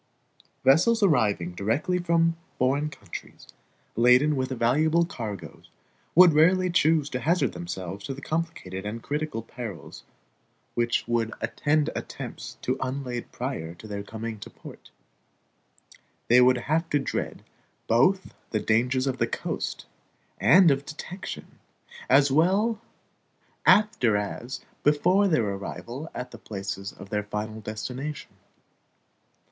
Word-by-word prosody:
Vessels 205 - +4
arriving 105 - +2
directly 115 - 0
from 165 -1 +2 0.2
foreign 140 +4 +1
countries, 100 - -10 0.5
laden 125 +6 +5
with 130 -1 -1
valuable 150 +7 +2
cargoes, 105 - -7 0.5
would 175 -1 +8
rarely 180 +4 +4
choose 160 -3 +3
to 125 - -2
hazard 150 - +1
themselves 90 +3 -6
to 135 - -4
the - - -9
complicated 155 - -3
and 110 +3 -5
critical 150 -6 -3
perils 115 -6 -8 0.7
which 120 -1 0
would 115 -1 0
attend 145 +6 0
attempts - - -7
to 130 +1 -1
unlade 130 -2 -4
prior 80 +1 -4
to 110 - -12
their 100 -1 -4
coming 110 +2 -5
into 105 - -10
port. - - -13 1.4
They 125 +2 +7
would 125 0 +5
have 155 +7 -1
to 145 - +2
dread 135 - -3 0.4
both 180 +12 +2 0.2
the 110 - 0
dangers 125 +5 +1
of 130 -1 -2
the - - +2
coast, - - -4 0.5
and 160 - +7
of 135 0 0
detection, 175 +5 -8 0.5
as 140 +1 +5
well 200 - +2 0.9
after 170 - +5
as 120 +5 -4 0.2
before 180 +7 +3
their 155 - +2
arrival 120 +9 -6
at 125 0 -5
the 115 - -11
places 100 -2 -5
of 95 - -13
their 105 -1 0
final 105 +1 -5
destination. 130 +7 -5
130 Hz, 125 wpm, -26 LUFS, 110-155 Hz, 1.4 s, would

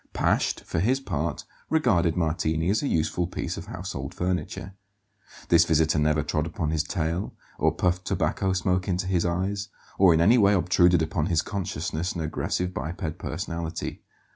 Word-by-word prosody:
Pasht, - - +1
for 85 - -2
his 125 +9 +2
part, 75 - -3 0.3
regarded 100 - +2
Martini 80 +1 0
as 110 - +1
a 145 - -1
useful 85 - 0
piece - - -4
of - - -8
household - - -6
furniture. 90 +1 -3 0.8
This 85 -1 +6
visitor 80 -1 +2
never 75 0 +2
trod 75 +1 -1
upon 80 -2 -2
his 80 -1 +1
tail, 85 +2 -2 0.2
or - - +3
puffed 90 0 0
tobacco 95 - 0
smoke 90 0 0
into 90 0 0
his 90 -2 +1
eyes, 95 +4 -2 0.3
or 95 -2 +7
in 80 - +4
any 110 +9 +5
way 100 -1 +5
obtruded 90 -2 +4
upon 80 0 -1
his 85 -4 +1
consciousness 90 -3 -3
an 85 - -4
aggressive 90 +3 -2
biped 85 -3 -4
personality. 85 -1 -4
85 Hz, 165 wpm, -26 LUFS, 80-95 Hz, 0.8 s, or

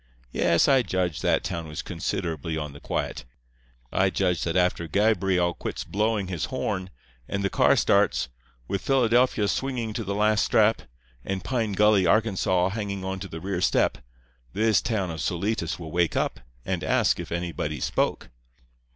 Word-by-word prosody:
Yes, 85 +6 +3
I 135 -2 +5
judge 90 -7 -1
that - - +2
town 85 -3 -4
was 75 0 -6
considerably 80 -2 -3
on 75 -2 -4
the 70 - -11
quiet. - - -3 0.7
I 95 0 +3
judge 90 -2 0
that 85 - -1
after 90 -2 +1
Gabriel 95 -2 +2
quits - - -5
blowing 105 -1 0
his 90 -3 -2
horn, 100 -8 -3 0.4
and 100 0 -2
the 100 - 0
car - - +4
starts, 60 0 +2 0.4
with 100 - -2
Philadelphia 125 -4 +3
swinging 120 -2 -2
to 115 - -3
the 100 0 -3
last 105 +1 +3
strap, 110 0 +3 0.4
and 95 -2 -3
Pine 110 +1 -1
Gully, 105 -2 +4
Arkansas, 95 -4 +2
hanging 100 -2 -4
onto 95 +1 -4
the 80 -2 -7
rear 95 -1 -2
step, - - +2 0.5
this 110 +1 +3
town 100 -7 -1
of 80 -2 -5
Solitas 90 -1 -1
will 80 -3 -8
wake 85 -1 +1
up - - -1 0.3
and - - -2
ask - - +2
if - - -6
anybody 85 -4 -3
spoke. - - -1
95 Hz, 160 wpm, -26 LUFS, 85-110 Hz, 0.7 s, I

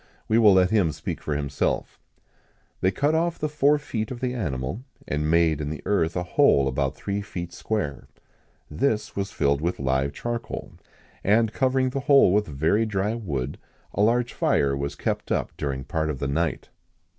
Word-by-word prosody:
We 110 - +3
will 105 -3 +7
let 95 -1 +4
him 100 -8 +3
speak - - -5
for 75 - -2
himself: 70 -2 -2 0.8
"They 95 - +3
cut 140 +10 +1
off 170 +1 +1
the 155 - -1
four 150 0 +3
feet 115 -7 -4
of 125 - -6
the 125 0 -1
animal, 75 - -3 0.3
and 75 +1 -1
made 80 -2 +3
in 75 - -3
the 80 - -6
earth 85 -5 +1
a 90 - -1
hole 70 -5 +4
about 65 +1 -1
three 100 0 -3
feet 85 -3 -6
square. 85 -9 -3 0.6
This 110 - -1
was 100 0 -2
filled 70 -1 +1
with 85 +3 -1
live 65 0 0
charcoal, 120 +6 -5 0.5
and, 110 +2 +3
covering 130 0 +1
the 135 - -2
whole 140 -8 +5
with 105 +1 +2
very 80 +10 +1
dry 105 +1 0
wood, 70 - -4 0.3
a - - 0
large 120 +3 +2
fire 70 -1 +2
was 70 +1 -3
kept - - -3
up - - 0
during 65 -2 -3
part 80 +3 -2
of 75 - -2
the 70 - -2
night. 80 +5 -1
95 Hz, 180 wpm, -25 LUFS, 75-115 Hz, 0.8 s, will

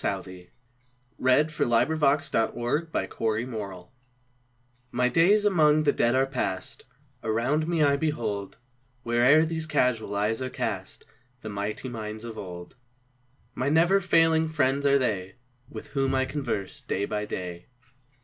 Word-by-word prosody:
Stanzas 95 -2 -4 0.7
Written 130 +2 +4
in 155 - -2
His 155 - -13
Library 120 +7 +2 0.9
1V/TY 125 - -5
days 195 +8 +4
among 155 -6 +4
the 145 - +4
Dead 120 +1 +2
are 135 +1 +3
past; 110 -9 -4 0.4
*• - - -6
• - - -1
Around 135 +8 0
me 165 -2 +2
I 140 -1 +3
behold, 110 -10 -3 0.5
Where'er 125 +7 +5
these 160 0 -3
casual 115 -8 0
eyes 105 +4 0
are 130 - -2
cast, - - -4 0.4
The 110 - -6
mighty 105 +4 -4
minds 110 -2 -6
of 115 -1 -7
old; 90 -2 -9 0.8
My 130 +3 -1
never 170 +6 +4
failing 165 -3 +3
friends 140 -2 +1
are 140 0 +5
they, 100 -8 -2 0.3
With 110 - -9
whom 135 -1 0
I 130 0 +2
converse 120 -9 -4
day 100 - -2
by 105 0 -3
day. 90 -3 -6
125 Hz, 140 wpm, -26 LUFS, 110-150 Hz, 0.9 s, Where'er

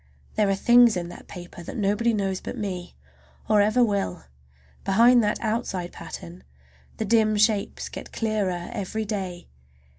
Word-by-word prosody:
There 210 -2 +2
are 195 - +2
things 240 +1 +5
in 175 -1 -4
that - - -12
paper 175 -1 -10
that 170 - -7
nobody 210 +3 +2
knows 195 -3 -1
but - - -6
me, 185 -4 -5 0.5
or 210 -1 +5
ever 215 +4 +4
will. 200 - -1 0.6
Behind 235 +5 +5
that 210 - 0
outside 215 -6 -2
pattern 85 +2 -9 0.5
the 220 - -2
dim 215 0 +3
shapes 210 -1 +1
get - - -9
clearer 200 -6 -2
every 215 +3 -3
day. 190 -4 -4
205 Hz, 150 wpm, -25 LUFS, 185-220 Hz, 0.6 s, things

